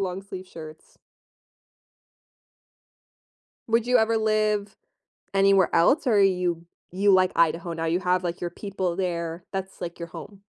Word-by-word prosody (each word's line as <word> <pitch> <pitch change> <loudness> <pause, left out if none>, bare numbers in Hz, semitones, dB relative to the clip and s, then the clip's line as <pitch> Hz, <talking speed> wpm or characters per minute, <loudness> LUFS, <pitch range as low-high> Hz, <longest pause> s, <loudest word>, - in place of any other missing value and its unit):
long-sleeve 190 0 -5
shirts. 155 -2 -12 2.7
Would 230 +1 +2
you 250 - +4
ever 225 +1 +2
live 215 -2 0 0.6
anywhere 195 -1 +3
else, 255 - +3
or 210 -4 +4
you 180 -3 +1 0.3
you 200 +2 +2
like 185 -1 +4
Idaho 170 +1 +1
now? 165 0 -3
You 170 +3 +1
have, 180 0 0
like, 175 0 -3
your 175 - -2
people 190 -4 -4
there, 170 -2 -3
that's, 190 -1 -6
like, 170 -1 -6
your 170 - -5
home. 200 +3 -11
185 Hz, 135 wpm, -25 LUFS, 170-200 Hz, 2.7 s, you